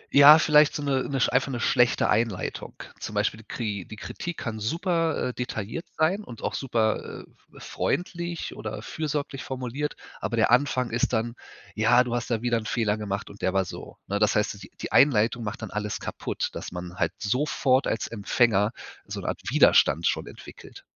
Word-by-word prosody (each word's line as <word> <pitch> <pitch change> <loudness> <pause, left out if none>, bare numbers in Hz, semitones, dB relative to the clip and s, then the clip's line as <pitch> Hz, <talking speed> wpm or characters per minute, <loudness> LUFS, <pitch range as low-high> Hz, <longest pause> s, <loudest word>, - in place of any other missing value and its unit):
Ja, 145 +2 +10
vielleicht 150 -1 +5
so 145 - -3
'ne 135 -2 0
'ne 135 -1 -1
sch - - +3
einfach 130 +2 +2
'ne 120 - -3
schlechte 120 0 +3
Einleitung. 110 -4 -1 0.2
Zum - - -6
Beispiel 105 - 0
die 110 - -15
Kri 105 -5 -3
die - - -9
Kritik 170 +9 -6
kann 110 -3 -4
super, 165 - 0
äh, - - -5
detailliert 125 - -5
sein 180 +7 +2
und 120 - -11
auch - - -1
super, 115 -5 -1 0.3
äh, - - -23
f - - -11
freundlich 170 +1 -3
oder 110 0 -6
fürsorglich 145 -2 -3
formuliert. 130 +2 -4 0.3
Aber 115 - -2
der 110 - +3
Anfang 125 -1 +2
ist 115 +1 0
dann: 115 +1 0 0.4
Ja, 115 +4 +4
du 120 -1 -4
hast 120 -1 -2
da 115 -1 -1
wieder 120 -1 +2
'nen 110 - -7
Fehler 110 -3 +1
gemacht 100 -1 -4
und 100 - -15
der 95 - 0
war 95 -1 +2
so, - - -9
ne? 100 +1 -2
Das 105 -1 +3
heißt 105 - +2
so 100 - -10
die 95 - -12
die - - -5
Einleitung 120 -3 +4
macht 105 +1 -5
dann 110 - -6
alles 105 0 -3
kaputt, - - -3
dass - - -6
man 90 0 -6
halt - - 0
sofort 130 +3 +1
als 115 - -1
Empfänger 105 -1 +2 0.4
so - - -5
'ne - - -3
Art - - -4
Widerstand 80 +5 +5
schon - - 0
entwickelt. - - -12
120 Hz, 200 wpm, -26 LUFS, 105-140 Hz, 0.4 s, Ja